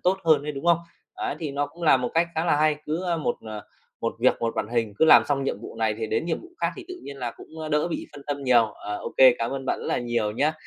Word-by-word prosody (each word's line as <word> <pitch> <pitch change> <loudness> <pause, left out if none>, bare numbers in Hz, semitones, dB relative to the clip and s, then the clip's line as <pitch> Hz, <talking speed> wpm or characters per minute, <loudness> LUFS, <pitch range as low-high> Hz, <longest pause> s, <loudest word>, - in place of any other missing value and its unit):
tốt 185 +2 +2
hơn 155 -3 +4
ấy, 150 - -4
đúng 135 +2 -7
không? 170 -1 +5 0.4
Ấy, - - -3
thì 155 -3 -3
nó 145 +1 -1
cũng 170 +3 -14
là 150 -4 +6
một 125 -1 -2
cách 170 +1 +3
khá 160 +2 0
là 155 - +3
hay, 155 0 +3
cứ, 160 +4 -2
ơ, 175 -2 0
một, 150 -6 -1
ờ, 110 -2 -7 0.4
một - - -1
việc - - +5
một 115 -1 0
màn 105 - -1
hình, 115 -3 -1
cứ - - +5
làm 160 - +8
xong 140 -2 0
nhiệm 105 - -2
vụ 115 - -9
này 110 -1 +1
thì 110 - -2
đến 110 +8 -1
nhiệm 170 - -1
vụ 345 - -13
khác - - +1
thì 380 - -8
tự 365 - -6
nhiên 140 - -8
là 125 -3 -3
cũng, 160 - -13
ơ, 155 -1 -5
đỡ 150 +2 +1
bị 170 - -4
phân 140 - -11
tâm 145 -1 -3
nhiều. 120 -3 +5
Ờ, 105 -1 -6
ô - - -7
kê, 130 -2 +8
cảm 115 0 -1
ơn 135 -1 -4
bạn - - 0
rất - - -6
là - - 0
nhiều 120 -3 -1
nhá, 150 +7 +1
140 Hz, 315 wpm, -25 LUFS, 120-160 Hz, 0.4 s, làm